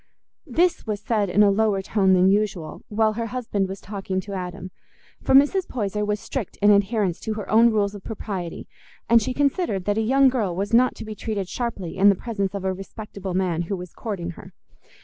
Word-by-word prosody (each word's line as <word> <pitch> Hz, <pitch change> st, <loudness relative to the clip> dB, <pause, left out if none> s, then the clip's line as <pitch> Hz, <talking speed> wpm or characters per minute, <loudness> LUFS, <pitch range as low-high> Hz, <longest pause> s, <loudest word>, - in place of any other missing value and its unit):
This 335 Hz, +1 st, +1 dB
was 210 Hz, -2 st, -2 dB
said 210 Hz, -2 st, 0 dB
in 205 Hz, +4 st, +4 dB
a 200 Hz, -, +5 dB
lower 205 Hz, -1 st, +1 dB
tone 190 Hz, -2 st, +2 dB
than 185 Hz, 0 st, +5 dB
usual, 195 Hz, -5 st, 0 dB
while 215 Hz, 0 st, +2 dB
her 230 Hz, +1 st, -3 dB
husband 220 Hz, -5 st, -2 dB
was 195 Hz, 0 st, -6 dB
talking 195 Hz, -2 st, -4 dB
to 200 Hz, +2 st, -8 dB
Adam; 185 Hz, 0 st, -6 dB, 0.5 s
for -, -, +2 dB
Mrs. 295 Hz, +7 st, +4 dB
Poyser 210 Hz, -3 st, -2 dB
was 210 Hz, 0 st, -1 dB
strict 240 Hz, -4 st, -5 dB
in 205 Hz, 0 st, +5 dB
adherence 200 Hz, -3 st, +2 dB
to 220 Hz, -1 st, -4 dB
her 210 Hz, -2 st, -6 dB
own 230 Hz, +2 st, +6 dB
rules 205 Hz, -2 st, +1 dB
of 200 Hz, -2 st, -10 dB
propriety, 195 Hz, -5 st, -5 dB, 0.4 s
and 235 Hz, 0 st, +5 dB
she 220 Hz, -, -2 dB
considered 280 Hz, -, 0 dB
that 205 Hz, +1 st, +1 dB
a -, -, +2 dB
young 270 Hz, +5 st, +4 dB
girl 220 Hz, -9 st, 0 dB
was 200 Hz, +4 st, -3 dB
not 250 Hz, +2 st, +4 dB
to -, -, -8 dB
be 215 Hz, -, -6 dB
treated 210 Hz, -3 st, -4 dB
sharply 200 Hz, -6 st, -4 dB
in 200 Hz, +2 st, +6 dB
the 200 Hz, -, +4 dB
presence 200 Hz, -3 st, -3 dB
of 195 Hz, -1 st, -4 dB
a 190 Hz, -, +1 dB
respectable 195 Hz, -1 st, -7 dB
man 180 Hz, -3 st, 0 dB
who 200 Hz, -, 0 dB
was 180 Hz, -1 st, -9 dB
courting 185 Hz, -6 st, -4 dB
her. 185 Hz, +2 st, -13 dB
205 Hz, 210 wpm, -23 LUFS, 190-225 Hz, 0.5 s, own